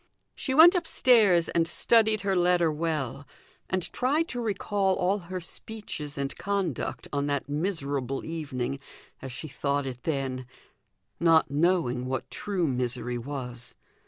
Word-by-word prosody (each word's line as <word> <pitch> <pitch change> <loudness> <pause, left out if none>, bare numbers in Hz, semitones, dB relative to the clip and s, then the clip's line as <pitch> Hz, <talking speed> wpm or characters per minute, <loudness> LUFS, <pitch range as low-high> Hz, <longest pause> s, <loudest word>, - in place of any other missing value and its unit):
She 265 - -3
went 330 +4 +9
upstairs 230 - +4
and 165 -1 +1
studied 220 +3 +3
her 195 -1 0
letter 175 -2 +3
well, 150 -4 -3 0.4
and 185 -1 0
tried 295 +6 +1
to 245 - -3
recall 200 -3 0
all 190 +3 +1
her 185 0 -6
speeches 170 -6 -4
and 140 0 -3
conduct 195 - -2
on 140 0 0
that 140 -2 -1
miserable 145 -4 -2
evening 140 -5 -3 0.4
as 130 - -6
she 155 - -7
thought 140 0 -1
it 125 -2 -6
then 135 -4 -2 0.7
not 165 -4 +4
knowing 145 -6 +1
what 130 -1 -3
true 195 -4 -1
misery 125 -2 -1
was. 125 -2 -6
160 Hz, 135 wpm, -27 LUFS, 135-195 Hz, 0.7 s, went